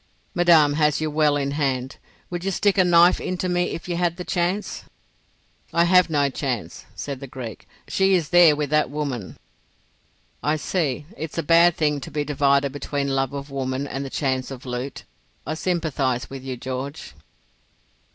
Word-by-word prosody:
"Madame 165 -5 +5
has 150 -1 +2
you 155 -1 -2
well 150 -1 +3
in 140 -1 -1
hand. 135 -3 -2 0.3
Would 175 0 -4
you 195 - 0
stick 195 +1 +2
a - - +7
knife 175 0 +5
into 185 0 -2
me 175 0 +1
if 165 - -5
you 175 -1 -2
had 175 -1 0
the 180 - -5
chance?" 180 +4 -2 0.9
"I 170 - +3
have 180 0 +5
no 145 -3 +2
chance," 120 - -4
said 140 -2 -5
the 140 - -8
Greek. 125 -3 -8 0.2
"She 190 0 +3
is 165 -4 0
there 175 -4 +7
with 145 -1 -3
that 150 -2 +2
woman." 140 -8 -4 1.0
"I 150 +1 +1
see. 150 -3 -2
It's 160 -5 -6
a 165 - 0
bad 170 +2 +5
thing 150 -2 +1
to - - -7
be 150 -1 -2
divided 140 -1 +2
between 140 0 -3
love 135 0 0
of 140 0 -6
woman 135 0 -2
and 135 0 -4
the 135 - -5
chance 130 -2 -1
of 135 -2 -9
loot. 125 +2 -5 0.4
I - - -2
sympathise 155 -8 -1
with 135 -1 -7
you, 130 -1 -5
George." 130 +4 -6
150 Hz, 180 wpm, -23 LUFS, 135-170 Hz, 1.0 s, a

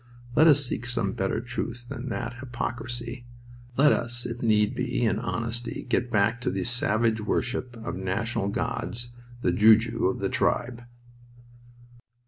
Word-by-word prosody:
Let 160 - +7
us 145 -2 +6
seek 120 -1 -3
some 115 -5 0
better 95 - -1
truth 120 0 -5
than 130 -1 -5
that 120 +1 -4
hypocrisy! 120 -1 -5 0.5
Let 145 +2 +6
us, 120 0 0
if 120 0 -5
need 105 -2 +3
be, 125 -1 -1
in 110 -1 +1
honesty, 115 0 -3
get 125 - +1
back 110 +2 +2
to - - 0
the 95 0 -1
savage 115 -1 +1
worship 125 +3 -1
of 115 +1 -5
national 100 +3 -1
gods, 120 +3 -3 0.3
the 90 - +2
Ju 110 +5 +7
ju 115 +1 0
of - - -1
the - - 0
tribe." 120 0 0
120 Hz, 150 wpm, -27 LUFS, 110-120 Hz, 0.5 s, Let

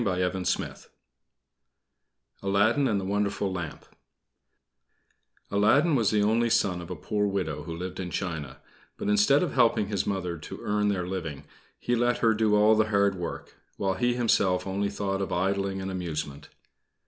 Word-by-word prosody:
ALADDIN 105 +8 +3
AND 105 -4 +1
THE 95 - -4
WONDERFUL 100 0 -1
LAMP 85 -4 -6 1.7
Aladdin 110 +11 +4
was 115 -6 +3
the 105 -1 +2
only 115 +3 +2
son 90 -5 +1
of 85 - -9
a 90 - -4
poor 105 +6 -1
widow 90 -7 -2
who 80 +2 -6
lived 90 +1 -6
in 90 -1 -4
China; 80 -9 -4 0.4
but - - -3
instead 105 - +4
of 180 - -2
helping 115 -5 +3
his 100 -3 -1
mother 90 -4 -2
to - - -8
earn 105 0 +1
their 95 -3 0
living, 85 -7 -5 0.3
he 120 - -1
let 120 +1 +2
her 115 -1 +3
do 105 -1 +2
all 105 +1 +5
the 110 0 +3
hard 100 -1 +3
work, 90 -3 -6 0.2
while 95 -1 0
he 120 +6 0
himself 100 -6 +2
only 100 +1 -1
thought 100 -1 -2
of 95 - -3
idling 95 +1 0
and 95 0 -4
amusement. 75 -5 -5
100 Hz, 160 wpm, -27 LUFS, 90-105 Hz, 1.7 s, all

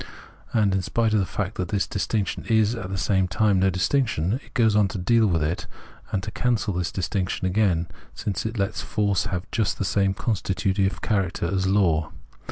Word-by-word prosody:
And 105 -4 +2
in 95 - +1
spite 115 +4 0
of 105 - +4
the 95 - 0
fact 100 0 -3
that 90 - -2
this 100 +2 0
distinction 100 0 -2
is 110 -1 +3
at 110 -6 -5
the 95 - -3
same 95 0 +1
time 100 0 +2
no 95 +1 +3
distinction, 95 - +1
it - - -21
goes 110 -3 +3
on 105 -2 +4
to 95 - -5
deal 110 +5 +3
with 85 -5 +1
it 80 +4 -2 0.4
and 95 - -1
to 105 - -5
cancel 115 -4 0
this 90 -1 -2
distinction 95 0 -2
again, 95 -3 +2 0.3
since 95 -5 -3
it 110 +1 -4
lets 100 +2 -1
force 100 -3 0
have 90 +1 -3
just 110 -5 0
the 100 - -1
same 100 0 +1
constitutive 95 -3 -1
character 95 -5 0
as 95 +2 0
law. 85 -6 +2
100 Hz, 195 wpm, -24 LUFS, 95-110 Hz, 0.4 s, of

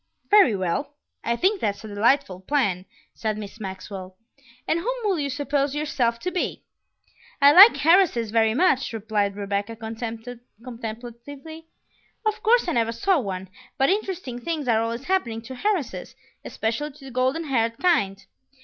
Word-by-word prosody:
"Very 395 - +6
well; 195 +11 -2 0.3
I 235 - 0
think 380 - +1
that's 200 0 -2
a - - -7
delightful 215 -1 +1
plan," 190 -5 0 0.3
said 215 -2 -3
Miss 215 +2 -8
Maxwell; 190 -1 -7 0.5
"and 325 - +1
whom - - -2
will 390 -6 +1
you 280 -1 -1
suppose 285 0 -1
yourself 260 -6 0
to 365 - -2
be?" 365 - -3 0.8
"I 280 +1 +7
like 375 0 +8
heiresses 325 - +4
very 220 0 +3
much," 270 -6 +2
replied 210 -2 -1
Rebecca 205 +2 -3
contemplatively. 235 +5 -8 0.6
"Of 430 0 0
course 475 -2 +3
I - - +1
never 230 -5 +1
saw 335 +10 +1
one, 190 -5 -5 0.3
but 270 - +3
interesting 370 - -3
things 310 -2 -3
are 225 -2 +3
always 230 +2 -3
happening 240 -11 -1
to 260 +1 -9
heiresses, 400 - -2 0.3
especially 235 +7 -3
to 280 -1 -15
the 265 - -9
golden 255 +6 0
haired 230 -6 0
kind. 200 - +1
245 Hz, 150 wpm, -24 LUFS, 220-310 Hz, 0.8 s, like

